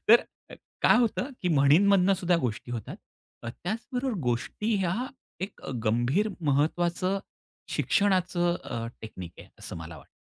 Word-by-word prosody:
तर 235 +2 +8 0.6
काय - - +6
होतं, 245 +3 +1
की 180 - +1
म्हणींमधनं 180 +6 +5
सुद्धा 180 -2 +2
गोष्टी 115 +1 -5
होतात. 115 -3 -5 0.5
त्याचबरोबर 230 - -3
गोष्टी 130 - -1
ह्या, 185 -2 0 0.5
एक 195 +2 -5 0.2
गंभीर 120 - +2 0.2
महत्त्वाचं 175 +6 +1 0.5
शिक्षणाचं 180 -3 +2
अ, 115 0 -4 0.2
टेक्निक 95 -6 -8
आहे - - -12
असं - - -7
मला 80 -1 -8
वाटतं. 70 - -17
175 Hz, 125 wpm, -28 LUFS, 120-200 Hz, 0.6 s, तर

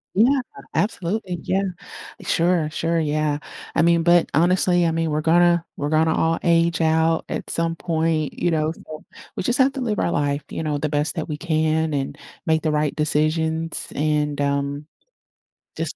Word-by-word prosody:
Yeah, 250 +8 +4 0.3
absolutely, 190 -2 -1
yeah. 190 +1 0 0.6
Sure, 170 -2 +1
sure, 165 +2 -1
yeah. 150 -1 0 0.4
I - - +4
mean, 170 0 +3
but, 175 0 +4
honestly, 175 +1 +3
I 165 - +2
mean, 165 0 -1
we're 150 0 0
gonna 170 +1 +3
we're 145 - -2
gonna 160 +1 +3
all 165 0 +1
age 170 0 +2
out 160 0 +2
at - - -4
some 165 0 0
point, 160 -3 -1
you 175 - 0
know, 155 0 0
so 155 -2 -11 0.3
we - - -2
just 245 +6 +1
have 265 +1 +5
to 270 - -5
live 220 -4 -1
our - - 0
life, 145 -1 -1
you - - -4
know, 150 -2 -1
the 150 +1 -2
best 150 +3 0
that 160 -1 -4
we 150 - -3
can 160 -1 0
and 135 -1 -3 0.3
make 160 0 +2
the 155 - 0
right 150 -1 0
decisions, 160 +2 0
and, 150 -1 0
um, 140 +1 -1 0.9
just - - -3
160 Hz, 175 wpm, -22 LUFS, 150-170 Hz, 0.9 s, have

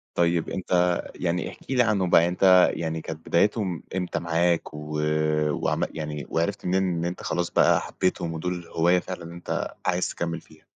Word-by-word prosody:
طيب 85 -1 +1
أنت 90 -1 +1
يعني 90 0 -1
احكِ - - -12
لي 125 -2 +4
عنهم 100 -5 +1
بقى، 85 0 +6
أنت 90 +1 +5
يعني 80 -1 -3
كانت 80 0 -8
بدايتهم 95 -1 +1
امتى 90 -2 -2
معاك 85 0 0
و 75 0 -5 0.5
وعم - - -1
يعني 75 -2 -5
وعرفت 95 +5 -1
منين 95 +1 +2
إن 85 -2 -1
أنت 90 - -4
خلاص 85 +1 -1
بقى - - +4
حبيتهم 85 -2 -2
ودول 90 +1 -4
هواية 85 +2 +3
فعلًا 90 -1 -7
أنت 85 - -4
عايز 90 0 +1
تكمل 85 -1 -3
فيها؟ 80 - -21
85 Hz, 165 wpm, -25 LUFS, 85-90 Hz, 0.5 s, بقى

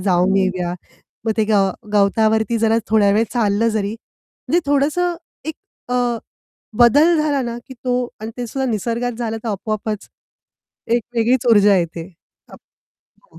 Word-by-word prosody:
जाऊन 185 0 +2
येऊया!" 185 -2 0 0.5
मग 220 - +1
ते 220 - +2
गव 200 -3 +3 0.2
गवतावरती 220 +3 +2
जरा 225 0 +3
थोड्यावेळ 215 0 +3
चाललं 225 -1 +1
जरी 215 -2 -1
म्हणजे 325 +8 -5
थोडंसं 305 +5 +1 0.3
एक 315 0 -4 0.4
अ, 245 -2 +1 0.6
बदल 290 +8 +6
झाला 290 -3 +1
ना, 235 -1 -4
की 260 - -9
तो 250 +1 -3 0.3
आणि 220 +1 -5
ते 245 -1 -4
सुद्धा 265 +4 -3
निसर्गात 235 +3 -2
झालं 225 -2 -2
तर - - -2
आपोआपच 215 +1 -3 0.8
एक 240 -1 +2
वेगळीच 240 +2 +2
ऊर्जा 205 -2 +6
येते. 170 -1 -2 0.5
आप - - -11 0.6
हो. - - -19
225 Hz, 145 wpm, -19 LUFS, 205-245 Hz, 0.8 s, बदल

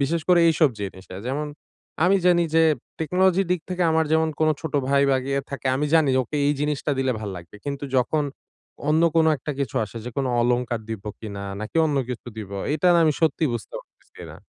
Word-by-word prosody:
বিশেষ 160 +5 0
করে 175 -1 +6
এইসব 155 -2 +4
জিনিসে। 95 -2 -7
যেমন 145 +4 -2 0.6
আমি 190 +2 +5
জানি 175 -1 +5
যে 165 - +6 0.4
টেকনোলজী 185 +3 +2
দিক 180 -2 +1
থেকে 180 0 -1
আমার 160 0 +3
যেমন 160 0 +3
কোন 155 - +4
ছোট 160 -2 -6
ভাই 140 0 +4
বা 135 - +4
ইয়ে 140 - +1
থাকে। 140 -1 -5
আমি 150 +2 0
জানি 155 -4 +4
ওকে 130 +5 -5
এই 145 - +3
জিনিসটা 150 0 -1
দিলে 130 -1 +1
ভালো 105 -3 -5
লাগবে। 85 +3 -11
কিন্তু 140 0 -4
যখন 145 +4 +1 0.6
অন্য 155 +2 +3
কোন 160 -1 +5
একটা 145 +3 -5
কিছু 135 -5 -3
আসে, 105 - -12
যে 125 - -5
কোন 135 -1 0
অলংকার 120 -1 0
দিব 110 -3 -6 0.2
কিনা? 100 -3 -6 0.2
নাকি 110 +8 -5
অন্য 150 -2 -1
কিছু 125 - -6
দিব। 105 -3 -7 0.2
এটা 170 +4 +2
না - - +5
আমি 155 - +3
সত্যি 160 0 +2
বুঝতে 120 - -6
পারতেছি - - -18
না। - - -11
145 Hz, 205 wpm, -24 LUFS, 125-160 Hz, 0.6 s, করে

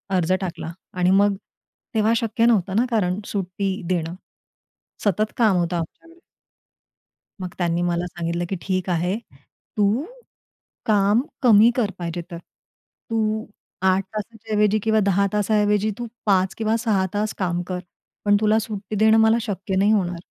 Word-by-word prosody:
अर्ज 180 0 +2
टाकला. 170 -3 -4 0.2
आणि 180 0 +1
मग 200 +1 +4 0.6
तेव्हा 220 +1 +3
शक्य 230 0 +1
नव्हतं 205 -5 +2
ना 235 +4 +3
कारण 190 -4 +1
सुट्टी 195 0 -2
देणं. 170 -2 -1 0.9
सतत 210 +2 +1
काम 220 -5 +4
होतं 175 0 0
आमच्याकडे. 330 - -8 1.2
मग 180 -1 -5
त्यांनी 175 -1 0
मला 175 0 0
सांगितलं, 170 0 -3
की 195 - -1
"ठीक 185 -1 -2
आहे, 180 +3 0 0.6
तू 210 +6 +2 0.8
काम 205 +1 +3 0.2
कमी 225 -3 +7
कर 220 -5 +1
पाहिजे 175 0 -3
तर. 170 - -5 0.7
तू 220 -1 0 0.4
8 190 +1 +3
तासाच्या 220 +1 -6
ऐवजी 210 0 +3
किंवा 220 -1 +3
10 200 0 +3
तासाऐवजी 210 0 +2
तू 240 - -5 0.2
5 190 -2 +2
किंवा 220 0 +1
6 205 -4 +1
तास 210 +1 -1
काम 175 -2 -1
कर. 180 -1 -3 0.5
पण 205 0 +5
तुला 215 0 +4
सुट्टी 215 -2 -5
देणं 220 +2 +5
मला 220 +1 +5
शक्य 195 -3 -3
नाही 200 +3 +3
होणार." 180 -5 0
200 Hz, 145 wpm, -23 LUFS, 180-220 Hz, 1.2 s, कमी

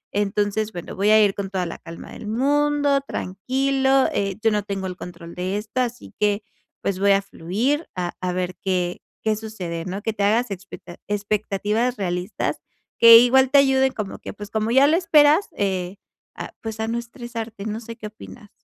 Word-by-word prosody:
Entonces, 205 +1 0
bueno, 175 -1 -7
voy 200 +2 +1
a 215 0 +7
ir 195 - +1
con 195 -1 -4
toda 185 -2 -2
la 165 - -6
calma 165 0 -10
del 210 - -9
mundo, 285 +4 +2
tranquilo, 265 +5 +1
eh, 195 -2 -1
yo 225 - +4
no 210 -1 +1
tengo 195 -1 -4
el 180 - -5
control 170 -1 -9
de 185 +3 -2
esto, 215 +4 -2
así 245 0 -4
que 205 0 +1 0.4
pues, 190 -1 -2
voy 200 0 +4
a 195 - +3
fluir 225 - -2
a 175 -1 -3
a 180 0 -1
ver 180 0 -2
qué 180 -2 -1 0.2
qué 220 -1 +2
sucede 185 -7 -5
¿no? 190 +2 -4
Que 225 - -1
te 200 -1 -2
hagas 225 +3 +2
expecta 185 -2 -9
expectativas 210 +3 -1
realistas 180 -1 -2 0.4
que 230 0 +11
igual 260 +2 +5
te 285 - +6
ayuden 265 -1 +4
como 210 -5 -5
que, - - -8
pues, 205 0 -9
como 220 0 -1
ya 265 +3 +6
lo 325 +3 +4
esperas, 315 0 +4
eh, 190 -1 -1 0.4
a - - -7
pues, 220 -1 -6
a 220 - -1
no 235 - -1
estresarte, 235 -3 -7
no 215 0 -3
sé 230 0 -8
qué 215 - -7
opinas. 210 -1 -13
210 Hz, 195 wpm, -23 LUFS, 195-245 Hz, 0.4 s, que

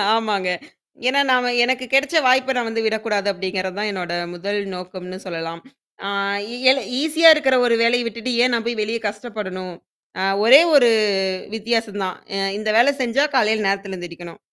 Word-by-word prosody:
ஆமாங்க. 210 -5 -1 0.6
ஏன்னா, 275 +2 +2
நாம 250 -1 +2
எனக்கு 255 +1 0
கிடைச்ச 275 +4 +2
வாய்ப்பை 260 +1 +3
நான் 240 -2 -1
வந்து 225 0 -2
விடக்கூடாது, 220 -2 -1
அப்படிங்கிறது 185 0 -4
தான் 210 0 -1
என்னோட 180 -3 -5 0.2
முதல் 200 +4 -3 0.2
நோக்கம்னு 185 0 -8
சொல்லலாம். 165 -2 -6 0.5
ஆ - - -2 0.6
எல 270 - +4 0.2
ஈஸியா 320 +1 +5
இருக்கிற 270 -4 +2
ஒரு 235 - +3
வேலைய 240 +1 +2
விட்டுட்டு, 230 +2 -5
ஏன் 250 - +2
நான் 230 -1 -1
போய் 235 -2 -3
வெளியே 225 +2 -2
கஷ்டப்படணும்? 205 -4 -6 0.5
அ - - -1 0.2
ஒரே 265 +6 +9
ஒரு 245 -4 +6 0.7
வித்தியாசம் 225 -2 -2
தான். 185 -1 -4 0.2
அ - - -2 0.2
இந்த 215 0 -3
வேலை 245 +5 +5
செஞ்சா 250 +3 +1
காலையில 215 -4 +2
நேரத்தில 195 -1 -2
எந்திரிக்கணும். 175 -1 -10
220 Hz, 160 wpm, -20 LUFS, 190-245 Hz, 0.7 s, ஒரே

